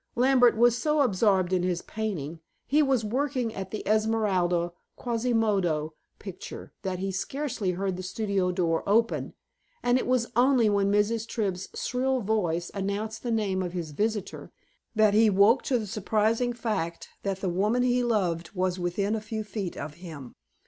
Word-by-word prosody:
Lambert 245 Hz, -2 st, +4 dB
was 240 Hz, 0 st, +5 dB
so 300 Hz, +4 st, +1 dB
absorbed 190 Hz, -6 st, +2 dB
in 185 Hz, -, +2 dB
his 180 Hz, -1 st, -1 dB
painting 170 Hz, -8 st, -4 dB, 0.3 s
he 295 Hz, +4 st, +3 dB
was 265 Hz, -6 st, +2 dB
working 255 Hz, 0 st, -1 dB
at 190 Hz, -1 st, -5 dB
the 215 Hz, -, -6 dB
Esmeralda 200 Hz, -6 st, +1 dB, 0.3 s
Quasimodo 215 Hz, -10 st, 0 dB, 0.2 s
picture 190 Hz, -2 st, -9 dB
that 190 Hz, -2 st, -3 dB
he 195 Hz, +1 st, -2 dB
scarcely 215 Hz, -1 st, -2 dB
heard 190 Hz, 0 st, -2 dB
the -, -, -5 dB
studio 195 Hz, -1 st, -1 dB
door 170 Hz, -2 st, 0 dB
open, 225 Hz, +2 st, +1 dB, 0.5 s
and 245 Hz, +1 st, +3 dB
it -, -, -3 dB
was 250 Hz, -2 st, +2 dB
only 245 Hz, -3 st, +4 dB
when 200 Hz, -1 st, +2 dB
Mrs. 215 Hz, +2 st, +1 dB
Tribb's 195 Hz, -5 st, -2 dB
shrill 260 Hz, +1 st, 0 dB
voice 175 Hz, -6 st, -1 dB
announced 205 Hz, +2 st, -3 dB
the 245 Hz, -, -4 dB
name 205 Hz, -5 st, 0 dB
of 180 Hz, -1 st, -4 dB
his 170 Hz, -4 st, -4 dB
visitor, 210 Hz, +5 st, -3 dB, 0.4 s
that 215 Hz, -1 st, +4 dB
he 220 Hz, +1 st, +5 dB
woke 205 Hz, +6 st, +5 dB
to 255 Hz, -, +1 dB
the 220 Hz, -, -3 dB
surprising 220 Hz, +4 st, 0 dB
fact 210 Hz, -8 st, -3 dB
that 195 Hz, -1 st, -3 dB
the 190 Hz, -, -1 dB
woman 210 Hz, +8 st, +1 dB
he 250 Hz, 0 st, +2 dB
loved 180 Hz, -8 st, 0 dB
was 185 Hz, 0 st, 0 dB
within 190 Hz, +4 st, -1 dB
a 220 Hz, -, -1 dB
few 215 Hz, 0 st, -4 dB
feet 205 Hz, -4 st, -5 dB
of 145 Hz, +1 st, -5 dB
him. 150 Hz, -8 st, -9 dB
210 Hz, 165 wpm, -27 LUFS, 185-230 Hz, 0.5 s, was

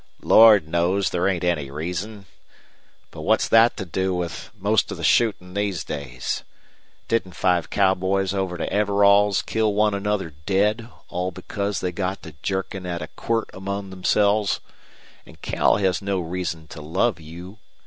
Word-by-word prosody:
"Lord 110 Hz, -7 st, +7 dB
knows 85 Hz, +4 st, +1 dB
there 90 Hz, +1 st, 0 dB
ain't 90 Hz, -3 st, -1 dB
any 85 Hz, -6 st, 0 dB
reason. 90 Hz, +8 st, -5 dB, 0.9 s
But -, -, -9 dB
what's -, -, +2 dB
that 115 Hz, +1 st, +5 dB
to 95 Hz, -, -4 dB
do 95 Hz, +2 st, -1 dB
with 90 Hz, -1 st, -4 dB
most 105 Hz, +2 st, +1 dB
of -, -, -5 dB
the -, -, -7 dB
shootin' 100 Hz, -6 st, +2 dB
these 100 Hz, -3 st, -1 dB
days? 65 Hz, -4 st, -4 dB, 0.6 s
Didn't 95 Hz, -6 st, -1 dB
five 90 Hz, -2 st, +1 dB
cowboys 95 Hz, 0 st, +1 dB
over 95 Hz, -2 st, -2 dB
to -, -, -2 dB
Everall's 100 Hz, 0 st, +4 dB
kill 110 Hz, -2 st, 0 dB
one 105 Hz, 0 st, +3 dB
another 100 Hz, -3 st, -2 dB, 0.2 s
dead 105 Hz, +4 st, +1 dB, 0.2 s
all 90 Hz, +1 st, -2 dB
because 100 Hz, +2 st, -4 dB
they 90 Hz, -, -1 dB
got 95 Hz, +2 st, -3 dB
to 80 Hz, -3 st, -10 dB
jerkin' 95 Hz, -1 st, -3 dB
at 85 Hz, -2 st, -3 dB
a 80 Hz, -, -8 dB
quirt 115 Hz, -1 st, -2 dB
among 100 Hz, 0 st, -5 dB
themselves? 100 Hz, +2 st, +1 dB, 0.7 s
An' -, -, -14 dB
Cal -, -, +2 dB
has 95 Hz, -2 st, 0 dB
no 100 Hz, -1 st, -1 dB
reason 85 Hz, -2 st, -4 dB
to 80 Hz, -, -9 dB
love 90 Hz, +7 st, 0 dB
you. 85 Hz, +6 st, -11 dB
95 Hz, 160 wpm, -23 LUFS, 90-100 Hz, 0.9 s, Lord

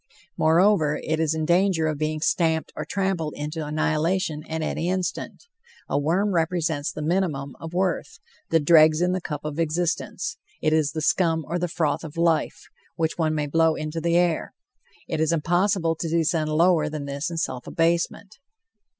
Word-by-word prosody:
Moreover, 160 Hz, -2 st, +3 dB
it 160 Hz, 0 st, -1 dB
is 160 Hz, -1 st, +1 dB
in 160 Hz, -1 st, -1 dB
danger 175 Hz, -1 st, +2 dB
of 155 Hz, -2 st, -1 dB
being 155 Hz, 0 st, -2 dB
stamped 160 Hz, -1 st, +1 dB
or -, -, -4 dB
trampled 190 Hz, -6 st, -2 dB
into 150 Hz, +2 st, -4 dB
annihilation 155 Hz, +2 st, 0 dB
at 160 Hz, 0 st, -2 dB
any 165 Hz, +2 st, -2 dB
instant. 185 Hz, 0 st, -3 dB, 0.4 s
A -, -, 0 dB
worm 185 Hz, +7 st, +1 dB
represents 160 Hz, -3 st, 0 dB
the 150 Hz, -, -6 dB
minimum 155 Hz, -5 st, -1 dB
of 165 Hz, +1 st, -8 dB
worth, 185 Hz, +1 st, -1 dB, 0.3 s
the 165 Hz, -, +4 dB
dregs 155 Hz, 0 st, +5 dB
in 180 Hz, +1 st, +2 dB
the 185 Hz, 0 st, -1 dB
cup 150 Hz, -3 st, -5 dB
of 150 Hz, +1 st, -4 dB
existence; 165 Hz, +1 st, -1 dB, 0.2 s
it 155 Hz, 0 st, +1 dB
is 155 Hz, -2 st, +1 dB
the 155 Hz, -1 st, -3 dB
scum 160 Hz, -2 st, +2 dB
or 175 Hz, -, -2 dB
the 180 Hz, -, -1 dB
froth 160 Hz, -1 st, -1 dB
of 160 Hz, 0 st, -9 dB
life, 165 Hz, -2 st, +1 dB, 0.3 s
which 160 Hz, +1 st, -2 dB
one 155 Hz, -1 st, +1 dB
may 150 Hz, -1 st, 0 dB
blow 160 Hz, +2 st, +2 dB
into 155 Hz, +1 st, -4 dB
the 170 Hz, +1 st, +2 dB
air. 175 Hz, -2 st, 0 dB, 0.5 s
It -, -, -2 dB
is 160 Hz, 0 st, +2 dB
impossible 170 Hz, +1 st, +1 dB
to 165 Hz, -, -3 dB
descend 165 Hz, -1 st, +1 dB
lower 160 Hz, 0 st, +3 dB
than 150 Hz, -2 st, -5 dB
this 140 Hz, +3 st, -3 dB
in 170 Hz, -, -5 dB
self 125 Hz, -6 st, -3 dB
abasement. 170 Hz, +3 st, -1 dB
160 Hz, 175 wpm, -24 LUFS, 155-175 Hz, 0.5 s, dregs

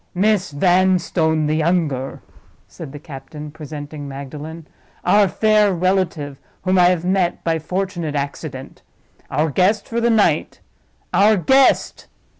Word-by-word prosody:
"Miss 200 Hz, -2 st, +2 dB
Vanstone, 170 Hz, -1 st, +2 dB
the 150 Hz, -, 0 dB
younger," 155 Hz, -5 st, -1 dB, 0.4 s
said 155 Hz, -5 st, -10 dB
the 145 Hz, -, -8 dB
captain, 150 Hz, +1 st, -9 dB
presenting 145 Hz, -1 st, -8 dB
Magdalen. 145 Hz, +4 st, -8 dB, 0.4 s
"Our 205 Hz, -1 st, +5 dB
fair 215 Hz, +1 st, +3 dB
relative, 170 Hz, -6 st, -1 dB, 0.2 s
whom 185 Hz, 0 st, +2 dB
I 175 Hz, -, +6 dB
have 175 Hz, -1 st, +2 dB
met 185 Hz, -1 st, 0 dB
by 165 Hz, -1 st, 0 dB
fortunate 175 Hz, -2 st, -3 dB
accident. 140 Hz, -1 st, -5 dB, 0.5 s
Our 155 Hz, 0 st, 0 dB
guest 200 Hz, +7 st, +1 dB
for 235 Hz, 0 st, -2 dB
the 235 Hz, -, +2 dB
night. 220 Hz, -3 st, +1 dB, 0.5 s
Our 210 Hz, +1 st, +5 dB
guest!" 265 Hz, +8 st, +2 dB
170 Hz, 125 wpm, -20 LUFS, 150-190 Hz, 0.5 s, I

